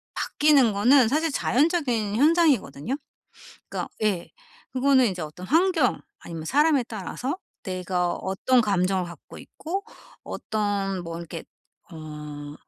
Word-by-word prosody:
바뀌는 280 -7 +3
거는 245 +4 +5
사실 310 +4 +1
자연적인 250 - +1
현상이거든요. 280 - +2 0.7
그러니까 - - -4
예 190 -5 0 0.4
그거는 260 -1 +4
인제 185 -5 -2
어떤 155 +4 -8
환경 325 -3 +2 0.2
아니면 165 -2 -7
사람에 290 - +3
따라서 240 - -4 0.2
내가 180 -1 -1
어떤 240 +7 +1
감정을 190 -3 +1
갖고 170 -1 -11
있고 385 +5 -5 0.4
어떤 200 -3 -2
뭐 165 0 -5
이렇게 170 -1 -7 0.5
어 150 -2 -8
215 Hz, 275 characters per minute, -25 LUFS, 180-280 Hz, 0.7 s, 거는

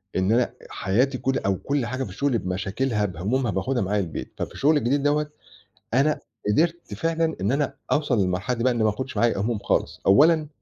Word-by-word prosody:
إن 95 +3 +2
أنا 120 +1 +2 0.2
حياتي 125 +8 0
كُل 135 +1 0
أو 100 -1 0
كُل 140 +2 -1
حاجة 130 +3 -3
في 100 - -6
الشُغل 125 +5 0
بمشاكلها 105 +5 -1
بهُمومها 105 +7 -1
باخُدها 120 +8 -1
معايا 105 +2 0
البيت. 80 -4 -6
ففي - - -4
الشُغل 150 +2 +3
الجديد 140 +2 +1
دوّة، 150 +1 +1 0.7
أنا 145 +4 +2 0.3
قدرت 170 +9 0
فعلًا 165 -1 0
إن 100 +6 +1
أنا 140 0 0 0.2
أوصَل 145 -6 +2
للمرحلة 95 +6 0
دي 115 - -2
بقى 130 - +4
إنّي 115 -2 0
ما 110 - +4
آخُدش 130 +5 -5
معايا 120 -3 +2
هُموم 115 +1 0
خالص. - - -1
أولًا 155 +8 +5
125 Hz, 190 wpm, -24 LUFS, 105-145 Hz, 0.7 s, أولًا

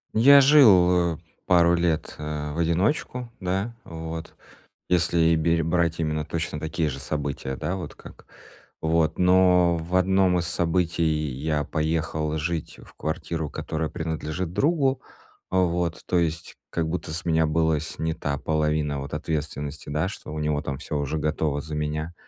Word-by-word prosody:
Я 140 +5 +8
жил, 90 - +6
э, - - -12 0.3
пару 85 -1 +5
лет, 85 -2 -1
э, 75 -1 -4
в 85 - -4
одиночку, 110 - 0
да, 95 +5 -2
вот. 80 0 -7 0.5
Если 85 -1 +2
и 80 0 +4
берь 80 +1 +2
брать 85 0 +1
именно 75 -1 -1
точно 80 -1 -3
такие 80 0 -1
же 70 -1 -5
события. 70 -2 -3
Да, 90 - -3
вот 85 - -7
как - - -14 0.5
вот, 80 -1 +1
но 90 -1 +4
в 85 +3 -4
одном 95 0 +3
из 85 - -2
событий 85 0 0
я 75 -1 0
поехал 80 0 -1
жить 80 +1 -3
в - - -17
квартиру, 80 -1 -3
которая 80 0 -3
принадлежит 80 +1 -4
другу. 140 - +1 0.5
А, 95 - 0
вот. 85 -1 -1
То 90 - +1
есть 80 0 -3
как 80 -2 -1
будто 85 -2 -4
с 80 - -4
меня 80 -1 +2
была 80 0 +2
снята 80 -2 -3
половина 75 -1 0
вот 70 +2 -7
ответственности, 75 -2 -4
да, 75 +4 0
что - - -9
у - - -5
него 75 -1 0
там 70 -2 -4
всё 75 - -4
уже 70 +2 -2
готово 75 -1 -1
за 75 +1 -8
меня. 75 +2 -3
80 Hz, 160 wpm, -25 LUFS, 75-90 Hz, 0.5 s, Я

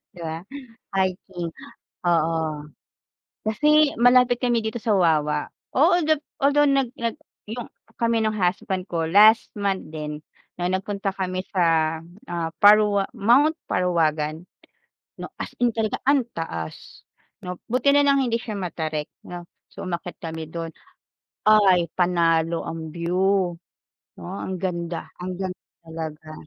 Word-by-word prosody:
'Di - - -13
ba? 160 0 -4 0.6
Hiking, 185 -2 -2 0.5
oo. 165 -1 +2 1.1
Kasi 300 +6 +4
malapit 245 +1 +4
kami 240 -1 +2
dito 220 0 -3
sa 230 - -1
Wawa. 150 -4 +2 0.3
Oo 345 +5 +5
gab 310 0 +2 0.2
although 290 +1 +4
nag 275 -3 +2
nag 230 -1 -1 0.3
'yong 230 +2 -6 0.2
kami 230 0 +1
no'ng 215 -1 0
husband 190 0 -1
ko 165 -2 -1
last 210 +6 +5
month 200 -2 -1
din 150 -1 -5 0.4
no'ng 180 +1 0
nagpunta 195 0 -2
kami 185 -1 -3
sa, 165 -3 +2 0.3
ah, 170 -2 -3
Parwa 205 -1 +6
Mt. 265 +9 +4 0.2
Parawagan, 160 -3 0 0.7
'no? - - -8
As - - -6
in 240 - +4
talaga 225 -1 -2
ang 275 -2 +3
taas, 85 - -7 0.3
'no? 180 0 -6 0.2
Buti 270 +4 +3
na 285 - +6
lang 280 -1 +4
hindi 250 -4 +1
siya 215 -4 -5
matarik, 160 -4 -3 0.2
'no? 175 -1 -9 0.2
So, - - -8
umakyat 175 0 -5
kami 160 -1 -6
do'n. 165 -1 -6 0.7
Ay 195 -5 +5
panalo 170 -2 +1
ang 160 -1 -6
view, 180 +2 +1 0.6
'no, - - -11 0.2
ang 190 - -4
ganda 170 -2 -4
ang 180 0 -4
ganda 185 -1 -4 0.3
talaga. 160 -1 -7
185 Hz, 135 wpm, -24 LUFS, 165-225 Hz, 1.1 s, Parwa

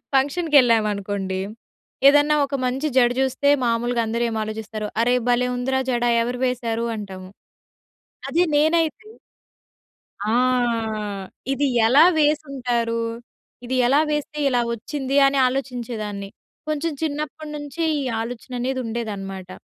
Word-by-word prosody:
ఫంక్షన్‌కి 290 +3 +3
ఎళ్ళామనుకోండి. 205 -4 0 0.7
ఏదన్నా 290 +1 +5
ఒక 275 - -11
మంచి 265 +5 -1
జడ 240 -1 +6
జూస్తే 265 +2 +1 0.2
మామూలుగా 235 +1 +1
అందరూ 230 +2 -1
ఏం 225 - -4
ఆలోచిస్తారు? 215 0 -5
అరే! 245 +1 +3
భలే! 245 +1 +2
ఉందిరా 265 +1 0
జడ 240 -1 0 0.2
ఎవరు 245 +1 -2
వేసారు? 235 -2 -1
అంటాము. 190 -3 -8 1.0
అది 340 - +2 0.2
నేనైతే 325 +7 +1 1.2
ఆ! - - +1 1.2
ఇది 280 +1 +1 0.2
ఎలా 270 +7 +6
వేసుంటారు? 260 -6 0 0.7
ఇది 260 - -2
ఎలా 275 +4 +4
వేస్తే 295 0 -3
ఇలా 245 -1 +2
వచ్చింది? 270 +4 -4
అని 275 0 0
ఆలోచించేదాన్ని. 235 -6 -4 0.4
కొంచెం 310 +2 -1
చిన్నప్పటినుంచి 300 0 -5 0.2
ఈ - - -2 0.2
ఆలోచననేది 245 +2 -4
ఉండేదన్నమాట. 200 -5 -5
250 Hz, 110 wpm, -22 LUFS, 225-285 Hz, 1.2 s, జడ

